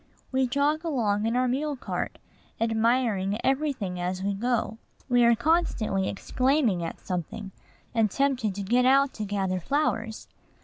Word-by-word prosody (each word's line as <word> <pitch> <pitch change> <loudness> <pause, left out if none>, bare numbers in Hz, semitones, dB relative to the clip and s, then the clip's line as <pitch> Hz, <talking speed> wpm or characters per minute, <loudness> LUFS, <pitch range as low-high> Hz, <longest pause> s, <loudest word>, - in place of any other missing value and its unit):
We 260 0 +2
jog 285 +5 +1
along 225 -9 0
in 230 - 0
our 255 0 +2
mule 285 +4 -1
cart, 250 - -4 0.4
admiring 225 -3 +1
every 285 +3 +2
thing 195 -9 -5
as 180 +1 -2
we 200 +1 0
go. 225 +1 -1 0.3
We 245 -2 +4
are 235 0 +6
constantly 235 - +1
exclaiming 250 - +1
at 165 - -5
something, 190 +2 -5 0.4
and 225 -2 +3
tempted 255 -5 0
to 200 - -4
get 245 +6 +2
out 275 +1 +4
to 215 - -4
gather 195 -2 -1
flowers. 225 - -1
230 Hz, 150 wpm, -27 LUFS, 200-265 Hz, 0.4 s, are